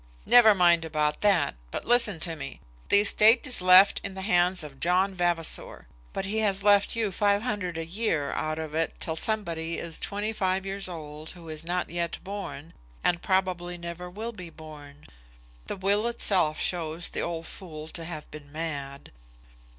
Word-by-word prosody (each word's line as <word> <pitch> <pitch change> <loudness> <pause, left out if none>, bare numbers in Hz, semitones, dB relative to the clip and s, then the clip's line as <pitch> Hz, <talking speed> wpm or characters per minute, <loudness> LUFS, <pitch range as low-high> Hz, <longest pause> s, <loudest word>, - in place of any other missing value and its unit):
"Never 220 -4 +7
mind 175 -2 +4
about 150 -2 -1
that, 200 -4 +3 0.2
but - - -5
listen 235 -7 +3
to 165 -1 -1
me. 150 - -8 0.3
The 200 - +5
estate 220 +4 +6
is 255 -8 +2
left 185 +2 +6
in 190 - -6
the 190 - -5
hands 180 -3 +2
of 140 -3 -11
John 185 +3 +2
Vavasor; 175 -3 +1 0.3
but 195 - -4
he 215 +3 -1
has 200 -2 +1
left 205 +1 +4
you 220 -3 0
five 205 +2 +1
hundred 205 -8 -3
a 165 - -4
year 165 -6 -1
out 155 0 -2
of 160 -1 -6
it 165 +1 -2
till 160 - -2
somebody 170 -5 -2
is 165 -2 -3
twenty 210 +2 -3
five 190 -2 -1
years 195 -1 -4
old 155 -2 -8
who 170 -3 -12
is 155 0 -7
not 175 +1 -2
yet 170 -1 -2
born, 195 -5 -7 0.3
and 175 -1 +1
probably 180 -2 -1
never 170 +1 -7
will 220 +6 -6
be 180 -5 -9
born. 150 -3 -13 0.6
The - - -4
will 200 +4 +1
itself 185 -9 +1
shows 170 -1 -1
the - - -3
old 165 -1 -4
fool 155 -5 -8
to 165 - -5
have 160 -2 -7
been 145 -2 -11
mad." 145 -3 -5
175 Hz, 180 wpm, -27 LUFS, 160-200 Hz, 0.6 s, Never